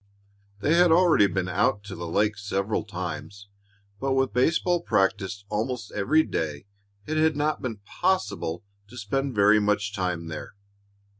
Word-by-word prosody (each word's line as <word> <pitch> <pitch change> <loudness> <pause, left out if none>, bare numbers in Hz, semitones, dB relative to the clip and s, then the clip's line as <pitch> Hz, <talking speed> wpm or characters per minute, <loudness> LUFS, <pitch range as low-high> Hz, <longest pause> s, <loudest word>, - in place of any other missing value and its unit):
They 150 - +2
had 175 -1 +5
already 165 - +5
been 95 -1 -2
out 100 +2 +1
to 100 -2 -8
the 85 0 -6
lake 105 +5 +1
several 100 +1 -2
times, 100 0 -6 0.5
but 135 +2 0
with 135 -4 +1
baseball 165 +7 +2
practise 95 +1 0
almost 110 +1 -3
every 155 +11 +2
day, 75 - -3 0.4
it 155 - -2
had 155 -1 +3
not 150 +1 0
been 115 -4 -4
possible 180 - -1 0.2
to 120 +4 -13
spend 135 +5 -2
very 105 +1 +5
much 105 0 0
time 90 -4 -2
there. 80 +4 -7
105 Hz, 150 wpm, -26 LUFS, 100-135 Hz, 0.5 s, had